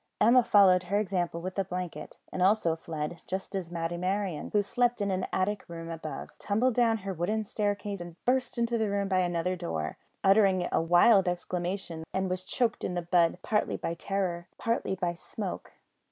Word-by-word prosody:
Emma 245 +3 +6
followed 190 -4 +6
her 200 +3 0
example 180 -4 -1
with 185 +2 -4
a - - +3
blanket, 180 -2 -6 0.2
and 185 - -2
also 185 -3 +3
fled, 160 0 -5
just 190 +1 -4
as 190 -4 -3
Matty 170 0 -3
Merryon, 185 -3 -2
who 205 -1 +3
slept 245 +3 +1
in 200 -1 0
an 185 0 -1
attic 200 +2 0
room 165 -1 -7
above, 160 -2 -6
tumbled 230 +5 +1
down 230 -1 +3
her 195 - -2
wooden 210 +6 -1
staircase 205 -3 -2
and 175 -1 -8
burst 250 -1 +1
into 235 0 +1
the 220 -2 +1
room 200 0 0
by 190 -1 +2
another 175 0 0
door, 80 - -4 0.2
uttering 195 -2 +4
a - - +2
wild 180 +4 +5
exclamation 175 -1 -3
that 190 - 0
was 185 -1 -2
choked 230 +4 -1
in 180 - -2
the 175 - -2
bud 170 0 +3
partly 210 -1 0
by 165 - -3
terror, 175 -1 -2
partly 230 -4 -1
by 175 -2 -1
smoke. 185 +2 -6
185 Hz, 185 wpm, -29 LUFS, 175-205 Hz, 0.2 s, Emma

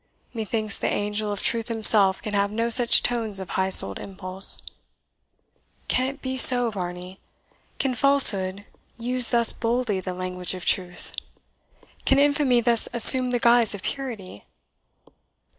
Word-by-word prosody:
Methinks 220 -2 -4
the - - -4
angel 210 +1 -5
of 205 - -7
truth 230 -1 -3
himself 215 -4 +2
can 210 - -8
have 200 0 -2
no 230 +2 -4
such 240 0 +5
tones 225 -5 0
of 190 - -10
high 190 0 -3
souled 100 - +1
impulse. 190 0 -1 1.3
Can 255 +1 -2
it 275 +1 -11
be 260 0 -6
so, 245 -2 +5
Varney? 180 -1 -10 0.6
can 265 -2 -4
falsehood 205 -8 +2 0.3
use 245 +1 0
thus 235 -1 +2
boldly 230 -3 -4
the 185 -1 -8
language 180 0 -5
of 180 - -10
truth? 180 -2 -3 0.9
can 270 - 0
infamy 285 -3 0
thus 235 -1 +1
assume 250 +2 +6
the 245 - -3
guise 235 -2 +2
of 195 - -13
purity? 225 - -9
220 Hz, 140 wpm, -21 LUFS, 190-245 Hz, 1.3 s, assume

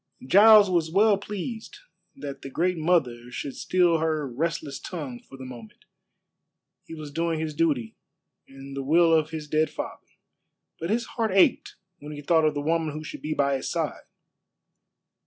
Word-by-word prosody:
Giles 210 +6 +8
was 170 -3 +1
well 205 +4 +4
pleased 210 +3 -6 0.4
that 140 - -7
the 135 - -7
Great 180 +6 0
Mother 135 -8 +1
should 135 +2 -6
still 175 -3 +2
her 155 -2 -1
restless 145 +2 -3
tongue 145 -9 -6
for 135 - -14
the 130 - -9
moment. 120 -4 -12 1.0
He 165 - -9
was 155 -2 -8
doing 165 +1 -1
his 160 -1 -3
duty 145 -8 0 0.5
and 135 0 -11
the 140 - -3
will 165 +4 +4
of 155 -1 +3
his 155 -2 -6
dead 155 +1 +1
father, - - -7 0.7
but 165 - -4
his 230 +2 0
heart 225 -2 -2
ached 190 -1 +3 0.2
when 150 +1 -8
he 145 - -7
thought 160 +1 +3
of 155 -1 +1
the 145 - -2
woman 160 0 -1
who 155 - -6
should - - -8
be 155 0 -3
by 140 -1 +1
his 130 - -5
side. - - -3
155 Hz, 175 wpm, -26 LUFS, 140-175 Hz, 1.0 s, Giles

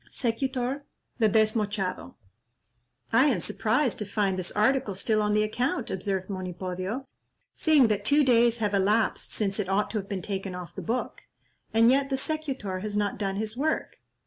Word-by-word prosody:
Secutor, 260 +2 -1 0.4
the 220 -2 +4
Desmochado." 210 -3 0 1.0
"I 260 +4 +6
am 255 -11 +2
surprised 230 - 0
to 210 - -1
find 200 -2 0
this 180 - -2
article 215 -1 +2
still 215 +3 +1
on 210 0 +1
the 210 0 +3
account," 245 +3 -1
observed 190 0 -2
Monipodio, 185 +5 -4 0.5
"seeing 300 -6 +4
that 205 -1 0
two 290 +7 +4
days 235 -2 +4
have 210 -3 -1
elapsed 205 +3 +1
since 200 -1 -1
it 195 -3 -1
ought 200 +2 +1
to 220 - -1
have 195 - -8
been 190 -3 -3
taken 195 -2 -4
off 180 -1 -8
the - - -6
book; 240 +3 -3 0.5
and 230 +2 +5
yet 275 +1 +2
the 270 - 0
secutor 265 -10 -3
has 205 +1 -4
not 205 -1 -1
done 195 -2 -1
his 215 +2 -2
work. 305 +5 -1
215 Hz, 175 wpm, -27 LUFS, 195-250 Hz, 1.0 s, I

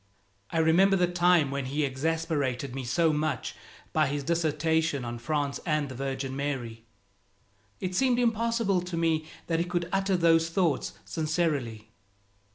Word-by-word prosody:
I - - -3
remember 170 +5 +4
the 180 -2 +3
time 175 -4 +3
when 140 -1 -2
he 145 +4 -1
exasperated 140 -2 -1
me 135 0 -4
so 160 +6 +2
much 150 -3 -1 0.4
by 155 -2 +3
his 140 +1 -2
dissertation 160 -2 0
on 120 0 -5
France 145 +2 -1
and 150 -3 0
the - - -6
Virgin 135 0 -3
Mary. 125 -5 -4 0.9
It 185 0 -3
seemed 250 +5 +2
impossible 230 -4 +1
to 180 -1 -5
me 160 -2 +1 0.2
that 165 -1 0
he 170 - +1
could 175 -1 -2
utter 195 -1 +2
those 165 -1 +4
thoughts 170 -3 0
sincerely. 140 - -2
160 Hz, 150 wpm, -28 LUFS, 140-175 Hz, 0.9 s, remember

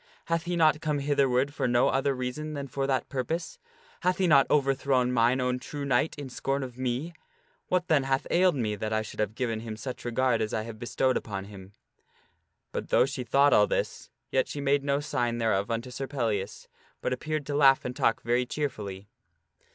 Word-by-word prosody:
Hath 165 0 -1
he 175 0 -1
not 155 -3 +4
come 150 -2 0
hitherward 140 -1 +1
for - - -1
no 120 0 +3
other 135 +1 +1
reason 130 +5 -4
than 140 -1 -4
for 135 +1 -2
that 135 -1 0
purpose? 160 +6 -3 0.4
Hath 180 +1 +1
he 190 - +2
not 140 -5 +5
overthrown 135 -3 +2
mine 120 +1 +3
own 125 0 0
true 145 +2 -6
knight 140 +3 +1
in 145 -2 -6
scorn 135 +2 -2
of 125 -2 -7
me? 130 +6 -2 0.5
What 180 -1 0
then 145 -4 +3
hath 135 0 0
ailed 180 -1 +4
me 110 -5 -1
that 110 +1 -4
I 110 0 +1
should - - -10
have 105 0 -1
given 115 -3 -1
him 110 -1 -6
such 130 +2 -6
regard 120 -1 +1
as 110 - -1
I 110 - -1
have 110 -1 -8
bestowed 125 +2 +1
upon 100 -3 -5
him? 100 -1 -12 0.5
" - - -44
But - - -4
though - - +5
she 135 -1 -4
thought 140 +4 +4
all - - +5
this, - - -2 0.2
yet - - +2
she - - -5
made 140 0 +2
no 140 0 +1
sign 120 -5 -1
thereof 110 -3 +1
unto 115 +2 -3
Sir 135 +2 -4
Pellias, 110 -8 -2 0.3
but - - -1
appeared 155 +3 -3
to 145 - -3
laugh 135 -2 +5
and 125 0 -4
talk 115 - +1
very 120 +1 +1
cheerfully. 105 -10 -4
130 Hz, 205 wpm, -28 LUFS, 115-145 Hz, 0.5 s, not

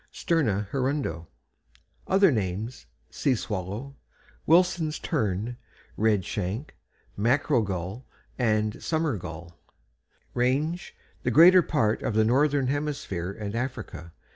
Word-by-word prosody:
= - - -39
Sterna 110 - 0
hirundo. 130 - -1 0.8
Other 195 -2 +5
names: 110 - -3 0.2
"Sea 135 - +1
Swallow," 105 +6 -5 0.5
"Wilson's 165 -2 +3
Tern," 110 - -2 0.4
"Red 105 -4 +2
Shank," 105 +8 -4 0.4
"Mackerel 125 +4 +2
Gull," 95 +4 -4 0.3
and 110 -3 0
"Summer 160 -5 0
Gull." 85 -1 -9 0.7
RANGE 145 +8 0 0.3
The - - 0
greater 180 +4 +8
part 115 -10 0
of 110 - -2
the 110 0 +4
northern 140 +3 +3
hemisphere 135 - -2
and 100 0 -6
Africa. 120 - -5
120 Hz, 110 wpm, -27 LUFS, 100-145 Hz, 0.8 s, greater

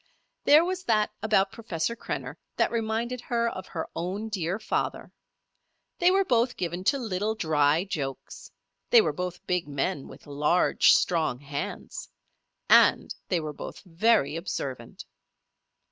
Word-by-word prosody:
There 305 +3 +7
was 370 0 -3
that 215 -2 +2
about 200 -3 +2
Professor 225 -1 -3
Krenner - - -5 0.2
that - - +1
reminded 230 +2 -2
her 235 -1 0
of 185 - -8
her 160 -3 -5
own 195 +6 -3
dear 185 -2 -2
father. 215 - -3 0.9
They 355 - +5
were 385 +1 +3
both 240 -2 +1
given 175 0 -3
to 280 - +3
little, 215 -3 -2
dry 155 -4 +2
jokes; 140 -9 -6 0.4
they 480 - +8
were - - -1
both 180 -1 -5
big 180 -4 -1
men, 140 0 -2
with - - -14
large, 150 +5 +3
strong 160 -8 +1
hands; 140 +1 -6 0.6
and - - +5
they 175 - +1
were 155 -2 -5
both - - -8
very 180 -4 +2
observant. 135 -8 -5
185 Hz, 140 wpm, -27 LUFS, 160-230 Hz, 0.9 s, they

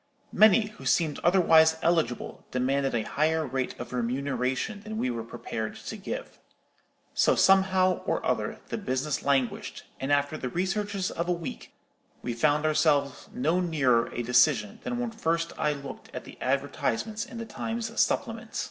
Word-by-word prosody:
Many, 215 +1 +6 0.2
who - - -10
seemed 160 -4 +2
otherwise 160 -3 +5
eligible, 165 -7 0
demanded 135 +1 0
a 115 - 0
higher 160 +4 +1
rate 130 -1 -3
of - - -7
remuneration 130 - -1
than 220 +1 -6
we 130 - 0
were 115 -1 -4
prepared 115 -1 -5
to - - -7
give. - - -6 0.7
So, - - +3
somehow 190 -1 +4
or - - -1
other, - - -1
the - - -3
business 140 -5 -1
languished, 135 -4 -1 0.2
and 135 +2 -2
after 145 +1 +2
the 125 - -3
researches 190 - -1
of 170 +2 -3
a - - +3
week 170 -3 -5 0.5
we 120 - -2
found 150 +5 +2
ourselves 150 -3 +1
no 160 +8 +1
nearer 135 -9 +2
a 120 - -3
decision 125 -3 +3
than 245 - -3
when 245 -1 -2
first 165 -5 -1
I 150 - +1
looked 140 -2 -9
at - - -5
the - - -13
advertisements 215 - -1
in 240 - -9
the 230 - -5
Times 225 0 -2
supplement. 225 0 -1
155 Hz, 160 wpm, -28 LUFS, 130-190 Hz, 0.7 s, Many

